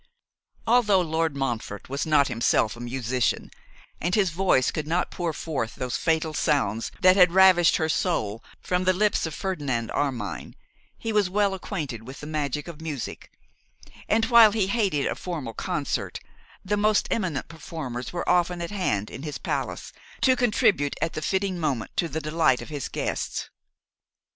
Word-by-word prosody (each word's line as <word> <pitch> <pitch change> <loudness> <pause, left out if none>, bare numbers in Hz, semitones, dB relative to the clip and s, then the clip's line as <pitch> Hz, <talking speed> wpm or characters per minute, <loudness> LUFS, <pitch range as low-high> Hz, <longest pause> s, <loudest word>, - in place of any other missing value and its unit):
Although 220 -5 +4
Lord 160 -2 -1
Montfort 115 -7 -3
was 140 +4 -3
not 145 -3 +4
himself 115 -2 +1
a - - -12
musician, 125 0 -1 0.5
and 175 +3 +1
his 195 -5 +2
voice 165 -7 +2
could 150 -1 -4
not 175 +3 0
pour 175 -2 -2
forth 145 -8 -4
those 125 -1 -3
fatal 160 -1 0
sounds 115 -7 0
that 185 0 +7
had 180 -3 +6
ravished 185 -2 +6
her 160 - +1
soul 120 - -1 0.2
from 180 0 -1
the 185 - +4
lips 205 -2 +1
of 155 - -6
Ferdinand 140 - -2
Armine, 125 -8 -3 0.4
he 225 -1 -3
was 205 -3 +3
well 200 +1 +2
acquainted 150 - -5
with 130 - -9
the - - -8
magic 150 -1 -2
of 165 -2 -9
music; 150 -6 -6 0.8
and 225 +1 +3
while 230 -3 +7
he 215 -4 +2
hated 195 - 0
a - - 0
formal 155 -10 -5
concert, - - -3 0.5
the 205 +2 0
most 210 0 +2
eminent 175 -11 -1
performers 150 -6 -6
were 175 - -4
often 175 0 +2
at 170 +1 -4
hand 105 - -1
in - - -7
his 150 -1 -5
palace, - - -4 0.3
to 260 -1 +5
contribute 210 - +2
at 165 - -1
the 155 - -4
fitting 190 +2 -1
moment 140 -9 -2
to 170 - +1
the 160 - -3
delight 155 -4 +2
of - - -11
his 145 -3 -4
guests. - - -3
160 Hz, 170 wpm, -25 LUFS, 135-190 Hz, 0.8 s, that